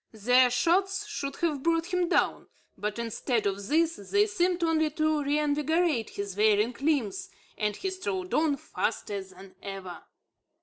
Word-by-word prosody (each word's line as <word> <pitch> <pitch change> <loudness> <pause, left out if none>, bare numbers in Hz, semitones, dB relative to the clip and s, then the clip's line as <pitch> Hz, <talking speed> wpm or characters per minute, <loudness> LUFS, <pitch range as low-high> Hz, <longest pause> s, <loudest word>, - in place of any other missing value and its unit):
Their 250 +4 +4
shots 380 +9 +1
should 350 -10 -4
have 305 -5 -1
brought 335 +3 0
him 360 -1 +1
down; - - +1 0.3
but, 210 +1 -4
instead 235 +1 -1
of 200 0 -2
this, 330 +3 +2
they 405 - +2
seemed 365 -4 0
only 315 -1 +2
to 310 0 0
reinvigorate 300 -1 +1
his 200 -2 -5
wearied 215 +4 +2
limbs, 275 -10 0 0.3
and 210 -1 -1
he 380 - -3
strode 195 - -4
on 305 -2 +2
faster 200 -6 -3
than 190 0 -15
ever. 195 -3 -7
285 Hz, 145 wpm, -28 LUFS, 210-335 Hz, 0.3 s, Their